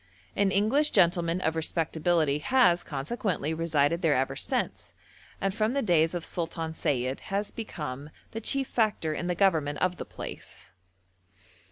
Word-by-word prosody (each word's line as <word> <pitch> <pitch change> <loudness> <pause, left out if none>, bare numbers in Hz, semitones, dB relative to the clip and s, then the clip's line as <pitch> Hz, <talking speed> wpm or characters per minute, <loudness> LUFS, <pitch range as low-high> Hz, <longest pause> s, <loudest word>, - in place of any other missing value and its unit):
An 200 -1 +3
English 225 +10 +2
gentleman 170 0 +3
of 160 -2 0
respectability 160 -2 +1
has 180 - +4
consequently 160 - -2
resided 160 0 +1
there 160 -4 +3
ever 130 +1 0
since, - - -2 0.4
and 195 -1 0
from 220 +3 0
the 280 - 0
days 165 -4 +3
of 170 - -3
Sultan 165 -1 -3
Sayid 130 -4 -1
has 200 +1 -1
become 150 - -6 0.2
the 225 - -5
chief 270 +3 0
factor 210 -9 0
in 175 - -3
the 180 - 0
government 160 -7 +2
of 180 +3 0
the - - -6
place. - - -9
170 Hz, 150 wpm, -28 LUFS, 155-200 Hz, 0.4 s, has